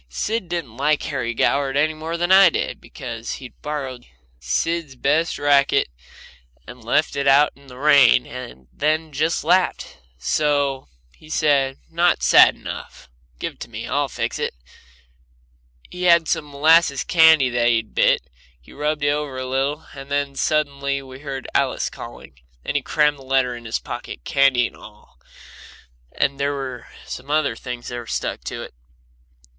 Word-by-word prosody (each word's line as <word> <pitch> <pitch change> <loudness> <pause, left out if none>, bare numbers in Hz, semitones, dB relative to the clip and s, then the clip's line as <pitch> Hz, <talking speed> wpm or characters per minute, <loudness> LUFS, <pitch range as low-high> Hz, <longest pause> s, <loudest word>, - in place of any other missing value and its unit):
Sid 205 - -3
didn't 155 -10 -4
like 150 +2 +1
Harry 125 -5 -3
Goward 140 +2 +1
any 155 +2 +2
more 160 +2 -5
than 175 +2 0
I 190 -1 +8
did, - - -3
because 115 0 -7
he'd 130 -2 -11
borrowed 135 -4 -5 0.3
Sid's 145 - -2
best 150 +6 +1
racket 140 - +3 0.8
and 125 -2 -12
left 150 +7 +1
it 140 0 -1
out 140 +2 +5
in 140 0 -20
the 125 -1 -12
rain, 140 -4 +5
and 120 - -10
then 155 +1 0
just 155 +4 0
laughed. 185 0 +1 0.2
So 140 - 0 0.3
he 155 - -18
said: 140 -4 +1
"Not 170 +2 +1
sad - - +7
enough. - - -9 0.3
Give - - -4
it - - -31
to - - -8
me. - - -6
I'll - - 0
fix - - -3
it." - - -2 1.4
He 180 - -8
had 170 -2 +5
some 160 -3 -1
molasses 150 0 +4
candy 160 -6 +5
that 120 0 +1
he'd 110 -2 0
bit, - - +3
and 65 - -35 0.3
he 60 - -18
rubbed 150 +1 -2
that 145 - +2
over 145 -3 -3
it 130 - -3
a - - -5
little, 140 +4 -1
and 135 0 -10
then 140 -1 -1
suddenly 140 -2 -1
we 130 0 -11
heard 135 -2 -6
Alice - - 0
calling, 65 -1 -11 0.3
and - - -3
he 145 - +2
crammed 150 +1 +1
the - - -13
letter 130 -2 +1
in 120 -1 -11
his 115 - -1
pocket, 120 - -8
candy 135 -3 +3
and - - -7
all, 105 -10 -16 0.9
and 140 0 -1
there 140 +1 0
were 130 -3 -6 0.2
some 130 +2 -8
other 150 -5 +1
things 125 0 -7
in - - -6
there 120 - -7
that - - -8
stuck - - -3
to - - -5
it. - - -11
140 Hz, 175 wpm, -21 LUFS, 130-155 Hz, 1.4 s, I